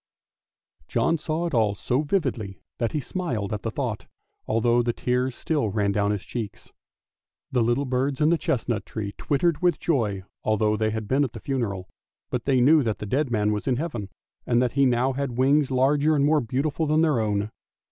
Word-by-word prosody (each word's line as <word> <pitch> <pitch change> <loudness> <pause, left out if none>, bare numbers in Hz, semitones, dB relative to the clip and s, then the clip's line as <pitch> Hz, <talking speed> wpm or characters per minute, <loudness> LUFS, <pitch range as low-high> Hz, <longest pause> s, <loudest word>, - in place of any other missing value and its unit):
" - - -69
John 165 -1 +1
saw 160 +3 -2
it 170 - -3
all 110 -4 +2
so 125 +7 0
vividly 130 - -2 0.2
that 115 -2 -1
he 155 - 0
smiled 125 - -3
at 105 - -3
the 115 - -2
thought, 115 -3 -4 0.4
although 120 +2 +3
the 120 0 0
tears 125 +1 -1
still 145 -9 -1
ran 100 0 +1
down 100 0 +1
his 105 -2 -1
cheeks. 115 -4 -6 0.8
The 125 - +2
little 120 +5 +1
birds 130 +1 -1
in 150 0 +4
the 170 - +3
chestnut 120 -2 -1
tree 100 -2 -5
twittered 155 +2 +1
with 175 -3 +2
joy 105 - 0 0.2
although 110 0 +2
they 110 0 0
had 110 -1 -4
been 135 +5 +2
at 125 -5 -3
the 115 - -7
funeral, 105 -8 -3 0.4
but 125 -2 -2
they 130 -3 +3
knew 150 +5 +6
that 110 -5 -1
the - - -6
dead 135 +6 0
man 105 -3 +1
was 105 +3 -3
in 130 - +2
Heaven, 120 - -4 0.4
and 120 -1 +3
that 125 -1 +1
he 140 0 +3
now 125 +2 +2
had 130 -3 -3
wings 140 +2 +3
larger 140 +4 +3
and 140 -1 +3
more 150 0 +3
beautiful 140 +6 -1
than 155 +2 +3
their 150 -7 +2
own. 105 -1 -1
125 Hz, 205 wpm, -25 LUFS, 110-145 Hz, 0.8 s, knew